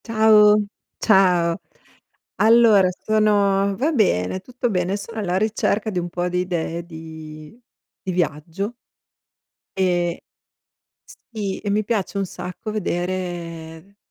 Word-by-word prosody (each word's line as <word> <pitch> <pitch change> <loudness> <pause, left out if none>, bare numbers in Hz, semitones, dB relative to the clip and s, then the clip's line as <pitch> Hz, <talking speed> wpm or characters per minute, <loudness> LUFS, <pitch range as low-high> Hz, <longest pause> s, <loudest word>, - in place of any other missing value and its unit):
Ciao. 215 -2 +5 0.3
Ciao. 180 -5 +3 0.8
Allora 220 -4 +6
sono 200 -1 +2
va 300 +6 0
bene, 185 - +1
tutto 250 +3 -3
bene. 185 -1 -1
Sono 225 +2 -7
alla 185 -3 -1
ricerca 215 +1 0
di 185 -4 -2
un 175 0 -4
po' 175 +1 -2
di 180 0 -1
idee 170 -2 -3
di 160 0 -10 0.4
di 190 - -4
viaggio 175 - -2 1.0
e 175 -2 0 1.1
sì, 205 -4 -3
e 205 - -4
mi 210 +1 +1
piace 200 -2 -2
un 195 - 0
sacco 180 +4 -7
vedere 175 -2 -4
190 Hz, 115 wpm, -22 LUFS, 175-215 Hz, 1.1 s, Allora